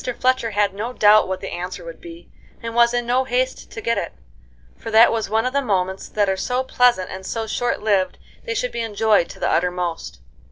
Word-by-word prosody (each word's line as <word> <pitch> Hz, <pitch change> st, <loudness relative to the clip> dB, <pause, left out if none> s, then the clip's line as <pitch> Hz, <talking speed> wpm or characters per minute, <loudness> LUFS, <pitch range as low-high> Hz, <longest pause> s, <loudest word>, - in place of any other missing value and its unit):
Fletcher 255 Hz, -2 st, +1 dB
had 205 Hz, -2 st, +1 dB
no 225 Hz, +5 st, -5 dB
doubt 215 Hz, -2 st, +5 dB
what 190 Hz, 0 st, -4 dB
the -, -, -6 dB
answer 180 Hz, 0 st, -6 dB
would 165 Hz, -1 st, -10 dB
be, 170 Hz, 0 st, -12 dB, 0.3 s
and 230 Hz, 0 st, -4 dB
was 235 Hz, 0 st, +4 dB
in 240 Hz, 0 st, -1 dB
no 250 Hz, +2 st, +2 dB
haste 255 Hz, 0 st, -2 dB
to 225 Hz, -, -8 dB
get 230 Hz, +1 st, 0 dB
it, -, -, -5 dB, 0.6 s
for -, -, -8 dB
that 225 Hz, +1 st, +6 dB
was 225 Hz, -3 st, -2 dB
one 220 Hz, +2 st, +1 dB
of 255 Hz, -, -1 dB
the 280 Hz, -, +2 dB
moments 190 Hz, -5 st, -2 dB
that 205 Hz, -1 st, +1 dB
are 190 Hz, -, +1 dB
so 250 Hz, +6 st, -1 dB
pleasant 245 Hz, -7 st, +2 dB
and 190 Hz, 0 st, -7 dB
so 225 Hz, +3 st, -3 dB
short 230 Hz, +1 st, -2 dB
lived 200 Hz, -3 st, +1 dB, 0.3 s
they 465 Hz, -2 st, -4 dB
should -, -, -1 dB
be 235 Hz, -, -3 dB
enjoyed 215 Hz, -4 st, +1 dB
to -, -, -11 dB
the -, -, 0 dB
uttermost. 180 Hz, -, -2 dB
220 Hz, 220 wpm, -21 LUFS, 190-245 Hz, 0.6 s, that